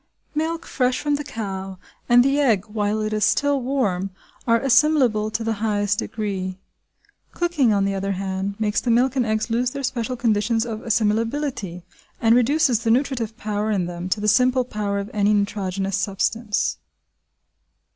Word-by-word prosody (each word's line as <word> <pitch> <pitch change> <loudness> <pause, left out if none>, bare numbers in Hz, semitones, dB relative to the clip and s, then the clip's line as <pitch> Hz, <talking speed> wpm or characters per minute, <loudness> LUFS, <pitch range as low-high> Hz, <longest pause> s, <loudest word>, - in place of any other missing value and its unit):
Milk 325 +2 -2
fresh 250 -2 0
from 295 -1 0
the 290 +1 -1
cow, 195 -7 -5 0.3
and 245 +1 +6
the 275 +1 +2
egg 220 -9 +2
while 210 0 -1
it 215 0 -2
is 215 -1 0
still 285 +3 +2
warm, 215 -8 -1 0.4
are 230 0 +4
assimilable 260 -5 +3
to 225 +1 -3
the 225 0 0
highest 205 -1 0
degree. 195 -5 -3 0.8
Cooking, 340 -9 +2
on 200 -1 +2
the 195 - 0
other 195 0 -2
hand, 190 +1 -3
makes 210 -1 0
the 245 - -2
milk 250 +3 +3
and 250 -3 +1
eggs 220 +1 -1
lose 240 +2 +1
their 275 +2 -6
special 250 -1 -2
conditions 225 -1 +1
of 225 -2 -4
assimilability 225 - -1 0.4
and 225 0 +4
reduces 255 0 +3
the 230 0 -2
nutritive 235 -3 0
power 210 0 -2
in 195 -4 0
them 175 +1 -5
to 210 - 0
the 210 - -2
simple 255 +3 +3
power 210 -4 -2
of 200 +1 -4
any 210 0 +3
nitrogenous 195 -1 -1
substance. 205 +3 -1
220 Hz, 165 wpm, -22 LUFS, 200-250 Hz, 0.8 s, and